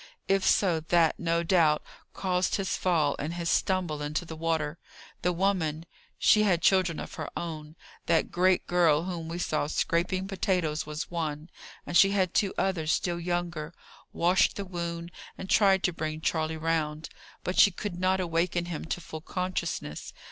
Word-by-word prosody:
If 195 0 +2
so, 175 -5 +3
that, 165 0 +2
no 170 0 0
doubt, 165 -4 +3 0.3
caused 185 -1 0
his 195 -2 -1
fall 160 -6 +1
and 160 +4 -3
his 170 -1 -1
stumble 180 -6 0
into 150 +4 -2
the 160 - -7
water. 160 -1 -1 0.4
The 180 - +1
woman 170 -4 0 0.3
she 215 - +5
had 180 -5 +2
children 185 -4 +3
of - - -7
her - - -5
own: 155 -2 -6 0.3
that 165 -1 +2
great 185 +1 +2
girl 170 -3 +3
whom 170 -3 -5
you 170 - -4
saw 155 -4 -1
scraping 180 +4 0
potatoes 180 -6 -1
was 150 +2 -5
one, 160 -1 -4 0.3
and - - -5
she 195 - +7
had 190 -3 +1
two 200 -2 +2
others 165 -5 0
still 175 -1 0
younger 175 -2 -3 0.4
washed 180 +2 +2
the 200 - -4
wound, 170 -1 -5 0.3
and 190 - -7
tried 195 -2 +4
to 180 - +1
bring 155 -1 -4
Charley 160 0 -1
round. 155 -1 -1 0.3
But 180 - -1
she - - +8
could 185 -1 -6
not 185 +1 +2
awaken 175 0 0
him 170 -3 -5
to 175 - -3
full 160 -1 -8
consciousness. 175 - -4
170 Hz, 170 wpm, -28 LUFS, 160-185 Hz, 0.4 s, she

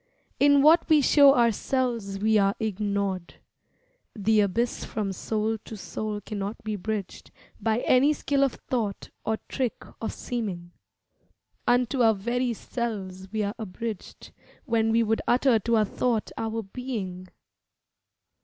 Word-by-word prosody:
In 285 0 +5
what 325 +3 +5
we 310 -1 +6
show 280 0 +6
ourselves 235 -3 0
we 215 +1 +3
are 195 0 +2
ignored. 200 -3 -2 0.8
The 215 0 +2
abyss 210 +4 0
from 200 -3 -3
soul 220 +3 -2
to 220 - -8
soul 210 +1 -4
cannot 205 +1 -5
be 215 -1 -2
bridged 205 0 -5 0.3
By 225 +1 0
any 265 +4 +4
skill 280 -1 0
of 270 - +1
thought 220 -6 -2
or 220 0 0
trick 255 -4 -2 0.2
of 225 - -2
seeming. 190 -8 -5 1.0
Unto 245 +2 +2
our 225 -2 +5
very 240 +5 -1
selves 195 -5 -5
we 215 -1 -1
are 200 0 -2
abridged 220 0 -6 0.3
When 225 -1 +1
we 230 +1 +3
would 225 0 0
utter 245 -1 +4
to 230 +3 +1
our 215 - +3
thought 230 +2 -1
our 225 0 -3
being. 195 -5 -5
220 Hz, 135 wpm, -26 LUFS, 200-245 Hz, 1.0 s, we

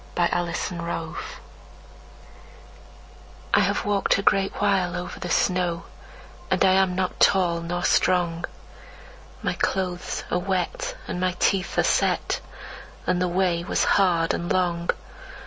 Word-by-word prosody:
Mary 175 -1 +3
Coleridge 175 -1 -1
The 180 - -7
Witch 165 -1 -4 2.4
I - - +6
HAVE - - +1
walked 205 -1 +2
a 200 - -2
great 195 0 +3
while 195 -3 +1
over 180 0 -6
the 175 - -5
snow, 175 -1 +1 0.7
And - - +3
I 190 - +5
am 190 -1 +3
not 185 0 -2
tall 170 -3 +3
or 175 0 -2
strong. 175 -2 +2 1.0
My - - 0
clothes 180 -2 -2
are 180 - +2
wet, 185 -1 -2
and 180 - -3
my 185 0 0
teeth 195 0 +1
are - - +4
set, - - +1 0.7
And 180 0 +1
the 180 - +2
way 175 -1 +1
was 185 - 0
hard 175 -4 +3
and 170 - -3
long. 175 -2 0
180 Hz, 140 wpm, -24 LUFS, 170-190 Hz, 2.4 s, I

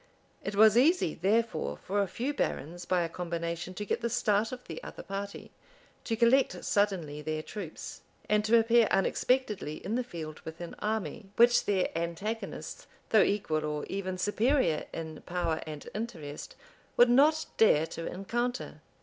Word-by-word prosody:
It 200 - -3
was 220 +2 +7
easy, 310 - +3
therefore, 220 +6 0
for 200 +2 -1
a 200 - 0
few 245 +10 -3
barons, 175 - -3
by 180 -1 +2
a - - -1
combination, 170 +1 -4
to 210 - -4
get 205 - -1
the 235 - 0
start 215 -2 +1
of 250 -1 -7
the 160 -1 -8
other - - -8
party, 200 +1 -6 0.5
to 225 - 0
collect 235 +4 +3
suddenly 180 -8 0
their 155 +1 -3
troops, 190 -5 -7 0.3
and 210 0 +3
to 230 +2 +5
appear 230 0 +5
unexpectedly 210 - +1
in 205 - -2
the 250 +2 +1
field 160 -9 -7
with 160 0 -9
an 175 -1 -6
army, 215 -1 -3
which 240 +1 +5
their 190 -5 0
antagonists, 205 - -4 0.2
though 220 - +6
equal 160 -7 +1
or 150 -1 -2
even 185 -1 -3
superior 205 - +1
in 160 -2 -6
power 175 -3 -1
and 150 -2 -7
interest, 165 -10 -6 0.4
would 240 - +8
not 300 +5 +5
dare 160 -8 +5
to 165 0 -6
encounter. 240 +7 -3
200 Hz, 160 wpm, -30 LUFS, 170-230 Hz, 0.5 s, would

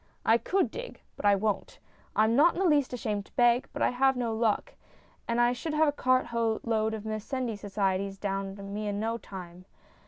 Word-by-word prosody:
I 225 +1 +5
could 380 - 0
dig, - - -7 0.2
but - - -7
I 200 - +6
won't; 210 +1 -2 0.4
I 215 - +4
am 220 +1 +2
not 320 +6 +5
in - - -3
the 385 - +2
least 295 -6 +3
ashamed 215 -5 -3
to - - -25
beg, 240 +1 +3
but - - -2
I - - +3
have 265 +2 +3
no 235 -2 -1
luck, 225 - 0 0.5
and 235 0 0
I 240 0 +4
should 305 +5 -4
have 315 0 +4
a - - +3
cart 255 -2 +2
load 220 -1 0
of 215 - -7
Mendicity 220 +2 -3
Societies 195 -1 -1
down 195 0 -3
on 200 0 -8
me 210 0 -3
in 205 0 -2
no 225 +2 -1
time. 180 -3 -10
225 Hz, 215 wpm, -29 LUFS, 205-255 Hz, 0.5 s, I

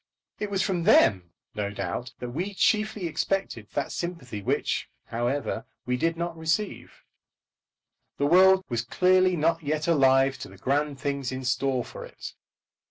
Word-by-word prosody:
It 210 - -3
was 195 -1 0
from 175 -4 -1
them, 95 - +5 0.2
no 105 -1 -2
doubt, 100 +5 -4
that 125 -1 -6
we 185 +9 -3
chiefly 215 -2 +1
expected 165 - -2
that 140 - -1
sympathy 165 - -5
which, - - -1 0.2
however, 120 +5 -2 0.2
we 125 - 0
did 165 +6 0
not 170 0 -3
receive. 165 +6 -3 1.1
The 140 - +1
world 190 +4 +6
was 120 -2 -1
clearly 185 +8 +3
not 165 +2 +1
yet 155 +1 -2
alive 135 -4 +4
to - - -7
the - - -14
grand 145 +1 -1
things 140 -2 -2
in 130 0 -5
store 130 0 0
for - - -9
it. - - -9
145 Hz, 155 wpm, -26 LUFS, 125-180 Hz, 1.1 s, world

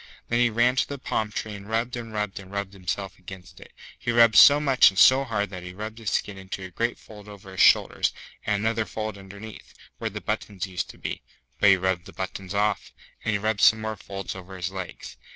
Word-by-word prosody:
Then 120 - +2
he 120 0 +4
ran 120 +3 +2
to - - +2
the 140 - -5
palm 110 -5 -2
tree 110 0 -4
and 100 +1 -10
rubbed 115 +2 -1
and 115 -2 -6
rubbed 105 -2 -3
and 95 -1 -12
rubbed 100 -1 -4
himself 95 0 -5
against 95 0 -11
it. - - -14 0.3
He - - -5
rubbed 115 -1 +5
so 145 +1 +9
much 135 -3 +6
and 95 - -11
so 130 +7 +7
hard 105 -5 -2
that 90 -1 -7
he 90 0 -8
rubbed 110 +2 -6
his 110 -3 -3
skin 100 -1 -2
into 95 0 -7
a 95 - -8
great 115 +6 -1
fold 105 -2 -14
over 100 -2 -12
his 95 - -1
shoulders, - - +4 0.3
and 105 - 0
another 110 0 0
fold 110 +2 -4
underneath, 100 +2 -11 0.2
where - - -2
the - - -6
buttons 100 -3 -3
used 95 -2 -4
to - - -12
be - - -5 0.4
(but 100 - +6
he 95 - +6
rubbed 90 -1 -1
the - - -12
buttons 95 +1 -5
off), 105 +1 0 0.3
and 110 - 0
he - - +2
rubbed 105 0 -1
some 110 - +6
more 110 0 -3
folds 100 0 -6
over 95 0 -9
his 90 +1 -3
legs. 95 -2 -8
105 Hz, 235 wpm, -25 LUFS, 95-110 Hz, 0.4 s, so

